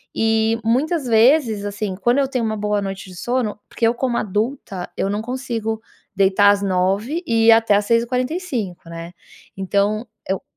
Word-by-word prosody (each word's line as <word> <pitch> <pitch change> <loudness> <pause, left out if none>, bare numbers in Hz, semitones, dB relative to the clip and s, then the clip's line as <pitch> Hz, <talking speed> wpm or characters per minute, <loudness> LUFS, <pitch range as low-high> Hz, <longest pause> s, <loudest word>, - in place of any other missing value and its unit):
e, 225 0 +2
muitas 275 +6 0
vezes, 230 -2 +3
assim, 205 -1 -3
quando 240 +7 +1
eu 275 - +2
tenho 250 -4 -1
uma 215 0 -1
boa 210 0 0
noite 195 -1 -6
de 180 - -11
sono 240 +1 -2
porque 230 - +1
eu 235 - +2
como 245 -2 -1
adulta 210 -3 -3
eu 195 - 0
não 205 +1 -1
consigo 230 -3 -3 0.3
deitar 200 +1 +5
às 200 0 0
21h 200 - 0
e 225 -1 +2
ir 230 - +9
até 225 -2 +5
às 205 0 +1
6h45, 240 - -1
né. 170 +1 -8 0.4
Então 200 +4 0 0.2
eu 190 0 -1
220 Hz, 170 wpm, -20 LUFS, 200-245 Hz, 0.4 s, ir